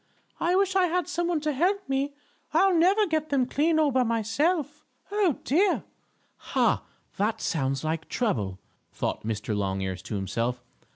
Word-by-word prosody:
I 350 +2 +2
wish 385 0 +2
I 370 -2 +4
had 355 +1 0
some 345 -1 -1
one 340 -3 0
to 305 0 0
help 380 +8 +1
me. 275 +1 -1 0.4
I'll 385 -1 +5
never 375 +6 +4
get 315 -4 -1
them 270 -3 +2
clean 315 +5 +1
all 305 -2 +3
by 260 0 +3
myself. 290 - 0 0.3
Oh, 405 - +2
dear!" 360 +7 +2 0.5
"Ha! - - +1 0.4
That 210 +3 0
sounds 135 -3 -1
like 160 0 -2
trouble!" 105 - -1 0.3
thought - - -3
Mr. 110 0 -2
Longears 95 -2 -2
to 110 - -4
himself. 115 +6 -2
280 Hz, 160 wpm, -27 LUFS, -, 0.5 s, I'll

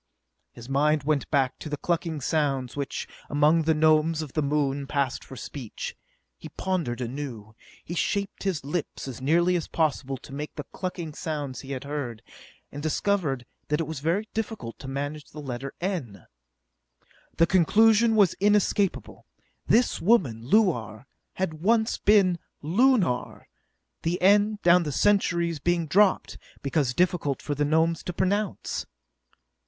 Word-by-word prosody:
His 120 0 -12
mind 150 +2 +2
went 150 -1 0
back 135 -4 +1
to 155 - -7
the 150 - -3
clucking 165 -1 -2
sounds 135 -4 0
which, 140 -1 -4 0.2
among 150 +3 +4
the 160 0 +2
Gnomes 155 +1 +3
of 145 - -10
the 155 - +1
Moon, 140 -1 0
passed 140 -3 -1
for 130 - -11
speech. 125 -1 -7 0.4
He - - -9
pondered 165 -11 -2
anew. 120 -4 -6 0.3
He 170 - -5
shaped 200 +3 -1
his 180 -8 -2
lips, 150 -1 -4
as 130 -1 -7
nearly 170 +6 +3
as 170 - -2
possible, 140 -4 -1
to 130 - -13
make 150 +2 -6
the 150 - -6
clucking 175 -4 -5
sounds 145 -4 -4
he 135 0 -6
had 130 - -5
heard, 135 -6 -5 0.5
and 145 - -7
discovered 155 -5 0 0.2
that 150 +1 0
it 165 - 0
was 155 -2 -5
very 170 +9 0
difficult 220 - -4
to - - -8
manage 145 +2 -4
the 155 - -11
letter 135 -1 -5
n! 150 - -4 1.1
The 165 - +6
conclusion 220 +6 +4
was 200 -5 +5
inescapable: 205 -1 +1 0.4
This 245 +2 +3
woman, 165 - +3
Luar, 125 - +2 0.3
had 160 -5 -3
once 220 +3 +2
been 195 -4 +4 0.2
Lunar, 190 - +1 0.5
the 170 +2 -1
n, 205 +3 +4
down 175 +1 +6
the 150 -3 -3
centuries, 170 -2 +2
being 170 +2 +1
dropped 195 +5 +2 0.2
because 140 -3 0
difficult 175 -6 +1
for 145 - -3
the 145 +1 0
Gnomes 160 +2 +2
to 180 - -3
pronounce. 195 +3 -1
155 Hz, 150 wpm, -26 LUFS, 140-185 Hz, 1.1 s, The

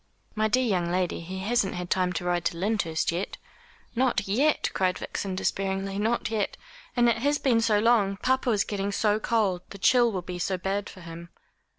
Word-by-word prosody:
"My 215 -1 +1
dear 255 +4 +2
young 180 -6 0
lady, 180 -1 0
he 180 +3 -7
hasn't 210 -1 0
had 180 0 -5
time 185 -1 +2
to 175 - -3
ride 175 -1 0
to 170 0 -1
Lyndhurst 180 -5 0
yet." 175 +4 -3 0.6
"Not 240 -5 +1
yet," 275 +10 +2
cried 185 -1 +1
Vixen 195 -2 -4
despairingly, 195 +1 -1
"not 225 +2 0
yet! 215 -3 -1 0.4
And 240 0 +5
it 235 -2 +3
has 290 +4 +2
been 240 -5 +2
so 225 -2 +3
long. 205 -3 +3
Papa 260 +3 +1
is 210 -3 +3
getting 200 -1 -3
so 210 +1 +1
cold. 210 -6 +1
The - - -9
chill 240 +4 +4
will 185 -3 -3
be 180 0 -6
so 185 +2 -1
bad 195 +2 -2
for 185 - -12
him." 170 0 -9
200 Hz, 200 wpm, -27 LUFS, 185-225 Hz, 0.6 s, And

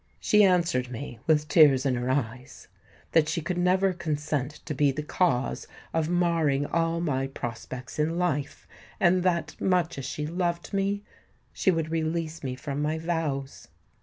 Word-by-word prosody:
She 210 0 +4
answered 175 -9 +2
me, 120 -1 -7
with 150 -2 +3
tears 145 -5 +6
in 135 - +2
her 125 +1 -2
eyes, 130 -2 -3 0.4
that 155 -2 +4
she 175 - 0
could 175 +3 -3
never 185 +2 +3
consent 150 -4 -2
to 150 - -3
be 145 0 +3
the 150 +3 -4
cause 140 -5 0 0.3
of 160 -1 0
marring 165 -5 +2
all 165 +1 0
my 135 -5 0
prospects 125 +1 -7
in 160 +3 +1
life, 150 -5 -2 0.3
and 185 0 +4
that, 175 -2 0
much 180 -5 +1
as 135 - -5
she 150 +3 -3
loved 170 +2 -2
me, 200 +1 0 0.5
she - - +1
would 165 -3 0
release 160 0 -2
me 130 -2 -3
from 140 +2 -4
my 155 +2 0
vows. 160 -5 -3
155 Hz, 165 wpm, -27 LUFS, 135-175 Hz, 0.5 s, tears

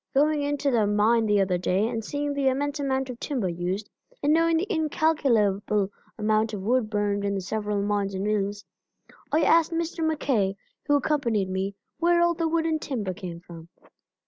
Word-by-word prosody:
Going 300 +2 +3
into 285 -1 0
the 220 -4 +2
mine 220 +2 +3
the 205 -1 +3
other 185 -2 +1
day, 185 +4 +1
and 230 -1 -3
seeing 290 +5 -2
the 280 -1 0
immense 285 +3 0
amount 265 -2 -1
of 240 - -10
timber 250 -10 -2
used, 180 +4 -3 0.4
and 290 +1 +4
knowing 330 0 +3
the 345 - 0
incalculable 235 - +1 0.3
amount 215 0 +1
of 190 - -6
wood 235 +1 +1
burned 205 -1 0
in 200 0 0
the - - -1
several 205 +1 -2
mines 200 -1 -1
and 190 - -2
mills, 205 -1 -1 0.7
I 310 - +3
asked 330 0 +4
Mr. 330 0 -2
MacKay, 265 -11 +1 0.3
who 290 - +4
accompanied 235 -10 0
me, 190 +1 -2 0.2
where 345 +1 +3
all 345 0 +4
the 330 0 -1
wood 325 0 0
and 315 -1 0
timber 215 -9 -3
came 175 -2 -8
from. 170 -1 -12
225 Hz, 185 wpm, -26 LUFS, 200-290 Hz, 0.7 s, and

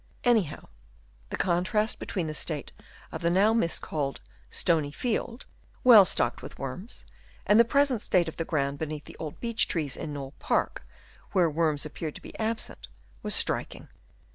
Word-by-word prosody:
Anyhow 220 - +1 0.6
the - - -4
con 175 -1 +1
trast 210 +3 0
between 180 -4 -3
the 155 - -4
state 150 -1 -2 0.4
of - - -6
the 170 - +2
now 200 +5 +4
miscalled 155 -8 -1 0.2
" - - -30
stony 160 -4 +2
field," 235 - -3 0.4
well 225 -6 +9
stocked 120 -7 0
with - - -10
worms, 160 - -7 0.4
and 210 +2 +5
the 235 - +7
present 275 -2 +2
state 175 -5 +2
of 160 - -6
the 165 - -1
ground 140 -3 -1
beneath 155 -1 -5
the - - -12
old 155 -2 -6
beech 230 -1 +2
trees 150 -6 -2
in 155 - -5
Knole 140 -1 -6
Park, - - -1 0.5
where 175 -4 +3
worms 155 -2 0
appeared 155 0 -6
to - - -9
be - - -11
absent, 225 0 -2 0.3
was - - +2
striking. - - +1
170 Hz, 170 wpm, -28 LUFS, 150-220 Hz, 0.6 s, well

